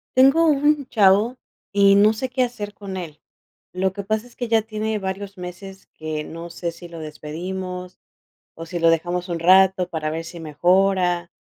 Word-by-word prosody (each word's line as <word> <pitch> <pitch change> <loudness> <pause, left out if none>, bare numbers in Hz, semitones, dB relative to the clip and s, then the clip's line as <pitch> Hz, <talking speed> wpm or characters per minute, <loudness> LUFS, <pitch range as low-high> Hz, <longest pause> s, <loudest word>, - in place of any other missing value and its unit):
Tengo 275 +6 +5
un 295 -1 +2
chavo 215 +1 +3 0.3
y 200 -1 +5
no 210 +2 +6
sé 255 +4 -4
qué 255 +1 -1
hacer 215 -4 -5
con 195 -2 -7
él. 160 -5 -8 0.5
Lo 190 +1 -1
que 200 0 -5
pasa 215 +3 -1
es 245 - -18
que 245 - -4
ya 225 -1 +3
tiene 215 0 -3
varios 195 0 -5
meses 185 +2 -9
que 155 -1 -4
no 165 +2 -8
sé 170 0 -4
si 175 +1 -12
lo 170 -1 -10
despedimos, 180 +4 -6 0.6
o 165 - -8
si 175 +1 -5
lo 165 0 +4
dejamos 175 +2 -1
un 170 -1 -2
rato 185 +1 +5
para 155 -2 -3
ver 165 +1 -4
si 170 +1 -9
mejora. 180 +2 +1
190 Hz, 185 wpm, -22 LUFS, 170-215 Hz, 0.6 s, no